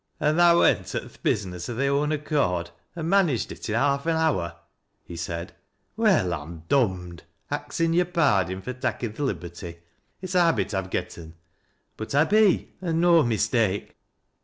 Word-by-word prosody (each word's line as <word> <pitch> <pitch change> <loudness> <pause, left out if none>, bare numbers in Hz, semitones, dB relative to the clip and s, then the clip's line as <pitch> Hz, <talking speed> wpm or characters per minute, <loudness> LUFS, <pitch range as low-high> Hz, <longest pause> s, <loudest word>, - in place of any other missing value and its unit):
" - - -45
An' 150 +1 +2
tha 170 0 +6
went - - +2
at - - -3
th' - - -22
business 90 -2 -2
o' 120 - -4
thy 135 +4 0
own 140 +2 +1
acccrd 140 - -1 0.2
an" 165 -2 -4
managt 175 - +2
it - - -7
i' - - -1
haaf 140 +3 +1
an 165 - +2
hour! 130 - 0 0.2
" - - -49
he - - -6
said. 85 0 -5 0.2
" - - -47
Well, 205 - +2
I'm 80 +1 -7
dom'd,— 90 - 0 0.3
Bxiu 165 0 -1
your 180 +1 +3
pardin 100 - +1
fur 125 - -4
takkin 120 -3 -3
th' - - -15
liberty; 85 - -4 0.4
it's 185 0 -6
a 180 - +4
habit 165 -9 +1
I'vo 95 -1 -2
gotten 85 -3 -5 0.3
— - - -45
but 110 +5 -5
I 145 - +6
be, 210 +2 +3
an' 165 -3 -1
no 170 -1 +5
mistake." 110 -4 0
125 Hz, 185 wpm, -25 LUFS, -, 0.4 s, tha